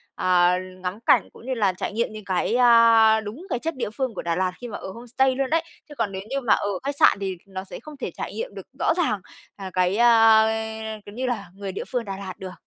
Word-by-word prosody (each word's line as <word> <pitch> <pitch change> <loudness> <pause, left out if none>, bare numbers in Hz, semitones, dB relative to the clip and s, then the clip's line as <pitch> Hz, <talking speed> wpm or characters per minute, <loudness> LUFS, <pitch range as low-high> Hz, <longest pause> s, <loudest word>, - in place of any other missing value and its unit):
à, 180 0 +3 0.2
ngắm 185 +3 -4
cảnh - - +4
cũng - - -15
như 260 - -2
là 205 -6 +1
trải 185 - -4
nghiệm 230 +2 0
những 215 -1 -9
cái, 185 +4 0
a, 230 -2 +6
đúng 220 - -8
cái 245 - -1
chất 325 +4 -3
địa 255 - -3
phương 255 +2 -3
của - - -5
Đà 170 -1 -1
Lạt 185 0 0
khi 245 - -5
mà 215 - -6
ở - - -8
homestay 245 +4 0
luôn 270 0 -1
đấy. 325 +1 +2 0.3
Chứ 295 - -11
còn 225 -6 -1
nếu 190 - -5
như 275 +1 -1
mà 245 - +3
ở 205 - 0
khách 280 +1 -2
sạn - - +6
thì 190 -2 -3
nó 190 -1 -6
sẽ 190 - -9
không 305 -1 -12
thể - - -4
trải - - -6
nghiệm 485 +2 -5
được - - -9
rõ - - +2
ràng, 310 - +1 0.4
à, 195 -2 -7
cái, 185 +2 +1
a, 225 -2 +6 0.6
kiểu 205 - -11
như 255 +2 -2
là 205 -7 -3
người 195 0 -6
địa 190 - -5
phương 245 -2 -1
Đà 195 -1 -5
Lạt 190 -1 -6
được. 185 -1 -7
220 Hz, 260 wpm, -24 LUFS, 190-250 Hz, 0.6 s, a